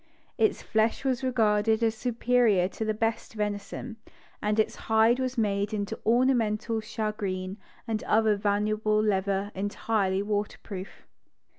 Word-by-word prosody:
Its 220 Hz, -2 st, +1 dB
flesh 220 Hz, +4 st, 0 dB
was 260 Hz, -1 st, 0 dB
regarded 220 Hz, -3 st, +2 dB
as 225 Hz, -1 st, +3 dB
superior 235 Hz, -4 st, +2 dB
to 210 Hz, -, -5 dB
the 215 Hz, -, 0 dB
best 225 Hz, +1 st, -2 dB
venison, 210 Hz, +3 st, -4 dB, 0.4 s
and 210 Hz, +1 st, 0 dB
its 215 Hz, -, +1 dB
hide 225 Hz, +3 st, +3 dB
was 260 Hz, 0 st, -2 dB
made 205 Hz, -1 st, 0 dB
into 205 Hz, +1 st, -3 dB
ornamental 230 Hz, -2 st, +2 dB
shagreen 210 Hz, -4 st, -3 dB, 0.3 s
and 220 Hz, -2 st, -2 dB
other 220 Hz, -1 st, +3 dB
valuable 210 Hz, +1 st, +1 dB
leather 200 Hz, -1 st, 0 dB
entirely 200 Hz, 0 st, -1 dB
waterproof 205 Hz, -2 st, -4 dB
215 Hz, 125 wpm, -27 LUFS, 205-225 Hz, 0.4 s, as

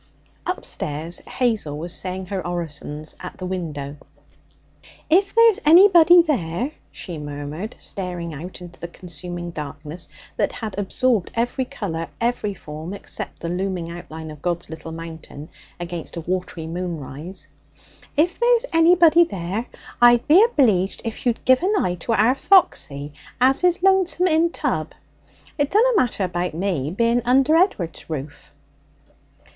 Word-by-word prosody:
Upstairs, 155 Hz, +4 st, -3 dB
Hazel 220 Hz, -, -1 dB
was 170 Hz, +3 st, -4 dB
saying 185 Hz, 0 st, -3 dB
her 190 Hz, 0 st, -3 dB
orisons 155 Hz, -3 st, -5 dB
at 180 Hz, -, -8 dB
the 185 Hz, -, -6 dB
window. 150 Hz, -6 st, -4 dB, 1.1 s
'If 390 Hz, +5 st, +3 dB
there's 460 Hz, -3 st, +6 dB
anybody 345 Hz, +1 st, +8 dB
there,' 245 Hz, -, -1 dB, 0.2 s
she 170 Hz, -5 st, -7 dB
murmured, 145 Hz, +7 st, -6 dB
staring 175 Hz, -4 st, -4 dB
out 175 Hz, +6 st, -8 dB
into 175 Hz, -1 st, -11 dB
the 170 Hz, -, -5 dB
consuming 175 Hz, 0 st, -7 dB
darkness 150 Hz, +2 st, -7 dB, 0.3 s
that -, -, 0 dB
had 220 Hz, -3 st, -5 dB
absorbed 215 Hz, +1 st, +1 dB
every 245 Hz, +3 st, 0 dB
colour, 195 Hz, -11 st, -4 dB
every 230 Hz, -4 st, -1 dB
form, 155 Hz, +3 st, -7 dB
except -, -, -7 dB
the 170 Hz, -, -3 dB
looming 180 Hz, -1 st, -3 dB
outline 160 Hz, -2 st, -8 dB
of 150 Hz, -1 st, -12 dB
God's 175 Hz, -1 st, -2 dB
Little 160 Hz, 0 st, -8 dB
Mountain 160 Hz, -2 st, -9 dB, 0.3 s
against 175 Hz, -1 st, -6 dB
a -, -, -3 dB
watery 180 Hz, -1 st, -3 dB
moon 170 Hz, 0 st, -4 dB
rise 155 Hz, +5 st, -9 dB, 0.7 s
'if 345 Hz, +4 st, +2 dB
there's 475 Hz, 0 st, +3 dB
anybody 335 Hz, 0 st, +6 dB
there, 195 Hz, -, -4 dB, 0.3 s
I'd 240 Hz, 0 st, +6 dB
be 350 Hz, +8 st, +7 dB
obleeged 220 Hz, -, +2 dB
if 230 Hz, +2 st, -4 dB
you'd 235 Hz, -, -1 dB
give 255 Hz, 0 st, +5 dB
an 395 Hz, +4 st, +1 dB
eye 180 Hz, -, 0 dB
to 230 Hz, -, -1 dB
our 225 Hz, +4 st, +4 dB
Foxy, 150 Hz, -, +2 dB, 0.3 s
as 265 Hz, +5 st, +3 dB
is 355 Hz, 0 st, +2 dB
lonesome 380 Hz, -2 st, +3 dB
in 335 Hz, -1 st, +3 dB
tub. -, -, -2 dB, 0.7 s
It 285 Hz, -1 st, +2 dB
dunna 450 Hz, +5 st, +4 dB
matter 240 Hz, -, +1 dB
about 180 Hz, -2 st, -2 dB
me, 170 Hz, -6 st, -1 dB
being 235 Hz, +6 st, +1 dB
under 265 Hz, +5 st, +4 dB
Ed'ard's 205 Hz, -, 0 dB
roof.' 145 Hz, -2 st, -7 dB
185 Hz, 140 wpm, -22 LUFS, 165-265 Hz, 1.1 s, anybody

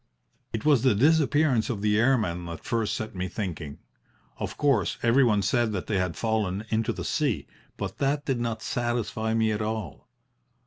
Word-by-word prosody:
"It 110 Hz, -, -4 dB
was 145 Hz, -6 st, +5 dB
the 130 Hz, -5 st, +3 dB
disappearance 145 Hz, -1 st, +3 dB
of 105 Hz, -5 st, -3 dB
the 105 Hz, 0 st, +3 dB
airmen 110 Hz, -9 st, +1 dB
that 85 Hz, -1 st, -7 dB
first 115 Hz, -2 st, 0 dB
set 110 Hz, 0 st, -5 dB
me 90 Hz, -1 st, -3 dB
thinking. 85 Hz, -7 st, -5 dB, 0.6 s
Of -, -, -4 dB
course, 145 Hz, -2 st, +2 dB
every 120 Hz, +4 st, +5 dB
one 105 Hz, -5 st, +3 dB
said 115 Hz, +2 st, +1 dB
that 95 Hz, -, -3 dB
they 100 Hz, -3 st, 0 dB
had 90 Hz, -2 st, -2 dB
fallen 110 Hz, -3 st, -1 dB
into 110 Hz, 0 st, +1 dB
the -, -, -5 dB
sea, -, -, 0 dB, 0.3 s
but -, -, -5 dB
that 145 Hz, +1 st, 0 dB
did 135 Hz, -3 st, 0 dB
not 115 Hz, -2 st, -3 dB
satisfy 115 Hz, -2 st, -1 dB
me 110 Hz, -1 st, +2 dB
at 105 Hz, 0 st, -2 dB
all. 110 Hz, -9 st, -4 dB
110 Hz, 180 wpm, -27 LUFS, 100-125 Hz, 0.6 s, was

